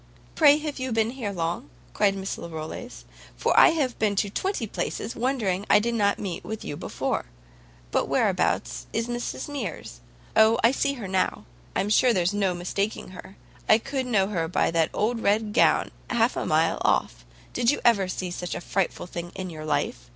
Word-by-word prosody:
"Pray, 295 -2 +6
have 300 -2 -5
you 260 0 -3
been 225 0 +1
here 240 -6 -4
long?" 170 -5 -3 0.2
cried 200 -2 +2
Miss 195 0 -4
Larolles, 165 +9 -7 0.3
"for - - +1
I - - +8
have 290 -7 -1
been 210 -2 +1
to 200 0 0
twenty 375 - -1
places, 220 - -4
wondering 225 -7 0
I - - +7
did 235 +3 0
not 200 -3 +2
meet 185 -4 -5
with 220 0 -6
you - - -4
before. - - -3 0.7
But - - +1
whereabouts - - 0
is 230 +1 -1
Mrs 240 0 -4
Mears? 210 - -6 0.4
O, 220 +1 +6
I 230 - +6
see 280 +1 0
her 225 -7 -6
now; 185 0 -1 0.3
I'm 195 - 0
sure 240 +3 +4
there's 180 -1 +1
no 195 -3 +1
mistaking 195 +5 -3
her; 185 +1 -11 0.3
I 215 - +8
could 260 +2 -3
know 205 -6 +3
her 165 -5 -1
by 165 - +1
that 165 -1 +2
old 230 +3 0
red 210 0 +1
gown - - +3 0.2
half 235 0 +2
a - - -2
mile 160 +1 +2
off. - - +1 0.3
Did 235 - +2
you 290 - +2
ever 205 -5 +4
see 185 0 -4
such 175 0 -4
a - - -3
frightful 195 +1 -1
thing 175 -1 -6
in 185 -2 -5
your 155 -1 -7
life? 125 -5 -2
205 Hz, 190 wpm, -26 LUFS, 180-235 Hz, 0.7 s, I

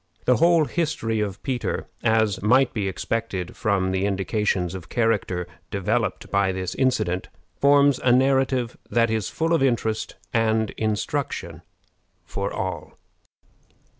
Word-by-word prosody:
The 125 - +4
whole 170 -1 +4
history 150 -10 -1
of 100 -2 -3
Peter, 130 -3 -2 0.2
as 110 -3 +2
might 125 +5 +4
be 100 -3 -1
expected 95 -1 -3
from 100 -5 0
the 95 +1 0
indications 95 -2 0
of 95 -3 -8
character 105 -6 0 0.2
developed 105 +1 -1
by 100 -1 +2
this 95 -1 -3
incident, 95 -9 0 0.3
forms 140 -1 +5
a 125 - +2
narrative 130 -1 +2
that 115 -1 +2
is 110 -4 -1
full 165 +1 0
of 165 - +3
interest 115 -4 0 0.2
and 110 -2 +1
instruction 110 - -3 0.6
for 100 +2 -3
all. 95 -4 -5
110 Hz, 130 wpm, -24 LUFS, 95-130 Hz, 0.6 s, forms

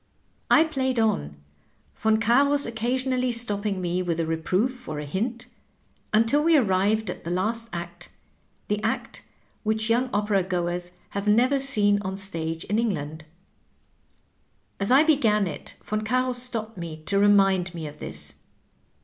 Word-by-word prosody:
I 315 - +7
played 265 -5 -1
on. 75 - 0 0.7
Yon 220 0 +4
Carus 280 +6 +3
occasionally 250 +2 -1
stopping 210 -4 0
me 180 0 -1
with 170 -2 -2
a 165 - +1
reproof 185 +10 -1
or 155 - -4
a 150 - -4
hint, 230 - -3 0.7
until 230 +7 +3
we 330 -1 +5
arrived 205 -2 +1
at - - -10
the 170 - -5
last 225 +6 -1
act, 175 0 -7 0.6
the 210 0 -1
act 220 0 -3 0.4
which 220 0 0
young 250 +2 +2
opera 205 -1 +1
goers 175 -1 -3 0.2
have 200 +1 -4
never 250 +6 +4
seen 205 -7 +2
on 190 -1 -4
the - - -8
stage 165 -4 -3
in 210 +3 0
England. 160 -8 -3 1.5
As 195 - -1
I 265 +4 +6
began 230 -10 +3
it 170 - -7 0.2
Yon 215 0 0
Carus 250 +2 +1
stopped 225 -5 -3
me 165 -2 -6
to 200 +4 +1
remind 195 -3 +3
me 165 -2 -5
of 150 0 -9
this. - - -6
210 Hz, 150 wpm, -25 LUFS, 180-240 Hz, 1.5 s, I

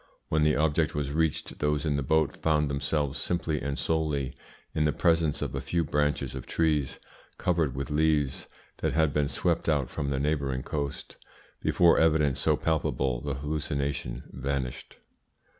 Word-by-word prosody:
When 80 - +2
the 75 0 +4
object 75 0 +1
was 70 -1 -1
reached 80 0 -1
those 75 0 0
in 75 -2 +1
the 70 - 0
boat 80 +2 +2
found 75 -2 +1
themselves 70 +1 -1
simply 80 -4 -1
and 70 0 -2
solely 75 -5 0 0.4
in 75 -1 +1
the 75 - +3
presence 80 -3 +2
of - - -4
a 65 - -2
few 85 +6 0
branches 75 -1 0
of 65 -2 -7
trees 75 -4 0 0.4
covered 80 -7 +1
with 70 +2 -4
leaves 75 -2 +1 0.3
that - - -1
had 80 -3 +2
been 75 -1 +2
swept 85 +2 0
out 70 -4 +1
from 70 - -2
the 70 -1 0
neighbouring 70 -3 0
coast. 70 0 -4 0.4
Before 85 -2 +4
evidence 75 -4 +3
so - - +2
palpable 70 -5 0
the 70 0 -3
hallucination 70 -3 -3
vanished. 65 -1 -4
75 Hz, 160 wpm, -28 LUFS, 70-80 Hz, 0.4 s, the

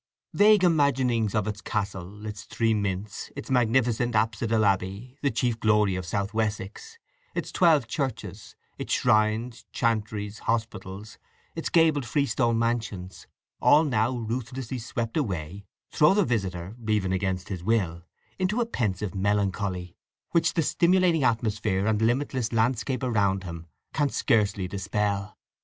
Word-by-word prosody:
Vague 210 -1 +5
imaginings 130 - +2
of 105 -1 +1
its 105 -1 -4
castle, 100 0 -4
its 105 -1 -6
three 115 -1 +1
mints, 100 0 -3
its 140 0 -7
magnificent 120 -1 +2
apsidal 110 0 +1
abbey, 100 +6 -1
the 140 - +2
chief 120 -1 -1
glory 105 -3 +3
of 90 -1 -4
South 100 +3 -2
Wessex, 110 - -3 0.4
its - - -3
twelve 160 -7 +4
churches, 110 - -4 0.2
its - - -5
shrines, 110 +2 +1
chantries, 105 -2 -1
hospitals, 110 -2 -4 0.4
its 165 - -3
gabled 160 -4 +4
freestone 120 -2 +1
mansions—all 115 - 0
now 115 -7 +1
ruthlessly 120 +2 -4
swept 115 0 -4
away—throw 100 - 0
the 205 -3 +3
visitor, 95 - -2
even 100 -4 +1
against 95 -1 -2
his 90 -4 -5
will, 90 -6 0 0.4
into 190 +5 0
a 240 - +2
pensive 105 - -2
melancholy, 95 -2 -1 0.4
which 165 -1 +2
the 165 - +2
stimulating 175 -2 +3
atmosphere 105 -4 0
and 110 0 +1
limitless 120 0 0
landscape 120 +3 0
around 100 -6 +1
him 85 -2 -8 0.3
can 145 -2 +1
scarcely 105 -8 +1
dispel. 100 +1 -2
110 Hz, 130 wpm, -26 LUFS, 100-125 Hz, 0.4 s, Vague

